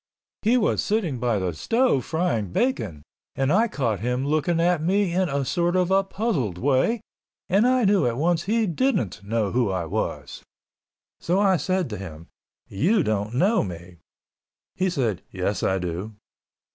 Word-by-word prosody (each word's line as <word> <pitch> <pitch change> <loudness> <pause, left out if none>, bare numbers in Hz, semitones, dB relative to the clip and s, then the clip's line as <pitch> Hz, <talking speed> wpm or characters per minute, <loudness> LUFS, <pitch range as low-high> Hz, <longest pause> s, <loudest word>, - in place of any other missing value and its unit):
He 230 +4 +3
was 225 - +1
sitting 185 - -1
by 120 -2 +1
the 90 -3 -2
stove 225 - +1
frying 160 - -1
bacon 95 - -1 0.3
and 135 +3 +1
I 220 +4 +4
caught 120 - -1
him 125 +3 -1
looking 155 +3 +1
at 175 -1 +2
me 190 +2 +1
in 185 -1 +1
a 140 -1 -1
sort 175 +4 0
of 185 0 +1
a 195 0 +4
puzzled 190 - -2
way 140 - +1 0.5
and 200 +6 +3
I 255 -2 +3
knew 195 -7 +3
at 120 0 -2
once 165 +3 +1
he 225 +2 +1
didn't 175 - -1
know 105 -1 -1
who 120 -4 +1
I 95 -3 -2
was. 80 - -4 0.8
So 180 +3 0
I 195 -2 +4
said 185 0 -1
to 105 - -4
him, 85 -4 -9 0.4
"You 180 - +1
don't 105 -1 -2
know 200 - +3
me." 90 -1 -8 0.8
He 185 0 0
said, 120 - -1
"Yes, 95 +2 -2
I 95 - +1
do." 90 +4 -5
150 Hz, 170 wpm, -24 LUFS, -, 0.8 s, I